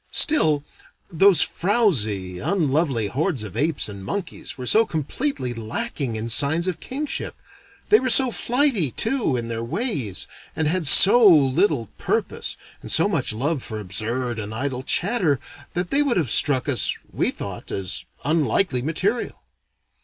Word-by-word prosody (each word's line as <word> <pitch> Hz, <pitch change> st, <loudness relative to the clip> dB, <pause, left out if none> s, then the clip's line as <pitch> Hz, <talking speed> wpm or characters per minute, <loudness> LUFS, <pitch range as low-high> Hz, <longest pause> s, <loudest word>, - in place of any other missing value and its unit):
Still 155 Hz, -, +2 dB, 0.5 s
those 180 Hz, -1 st, +4 dB
frowsy, 110 Hz, -, -1 dB
unlovely 145 Hz, -, 0 dB
hordes 140 Hz, -, -2 dB
of 100 Hz, -4 st, -9 dB
apes 155 Hz, 0 st, 0 dB
and 100 Hz, -2 st, -9 dB
monkeys 200 Hz, -, -6 dB
were 125 Hz, -, -7 dB
so 220 Hz, -, +4 dB
completely 160 Hz, -, -4 dB
lacking 120 Hz, -, -4 dB
in 110 Hz, +1 st, -4 dB
signs 145 Hz, +9 st, +3 dB
of 185 Hz, -, -3 dB
kingship; 290 Hz, +3 st, -5 dB, 0.5 s
they 430 Hz, -, +6 dB
were 260 Hz, -, -2 dB
so 255 Hz, +1 st, +6 dB
flighty, 245 Hz, -, 0 dB
too, 225 Hz, -, 0 dB
in 115 Hz, -1 st, -5 dB
their 115 Hz, 0 st, -4 dB
ways, 130 Hz, -, -3 dB, 0.3 s
and 160 Hz, -, -1 dB
had 165 Hz, 0 st, +1 dB
so 205 Hz, +11 st, +9 dB
little 150 Hz, -, +3 dB
purpose, -, -, -3 dB, 0.2 s
and -, -, -7 dB
so -, -, +5 dB
much -, -, 0 dB
love 135 Hz, +6 st, -2 dB
for 110 Hz, -2 st, -5 dB
absurd 115 Hz, +5 st, -3 dB
and 110 Hz, 0 st, -6 dB
idle 130 Hz, +1 st, -3 dB
chatter, 175 Hz, -, 0 dB, 0.4 s
that 175 Hz, 0 st, -2 dB
they 285 Hz, -, +2 dB
would 280 Hz, -7 st, 0 dB
have 150 Hz, -10 st, -1 dB
struck 130 Hz, +4 st, +3 dB
us, 130 Hz, -7 st, 0 dB, 0.2 s
we -, -, 0 dB
thought, -, -, -8 dB
as 95 Hz, -2 st, -5 dB, 0.2 s
unlikely 150 Hz, -, 0 dB
material. 185 Hz, -, -2 dB
150 Hz, 150 wpm, -22 LUFS, 120-200 Hz, 0.5 s, so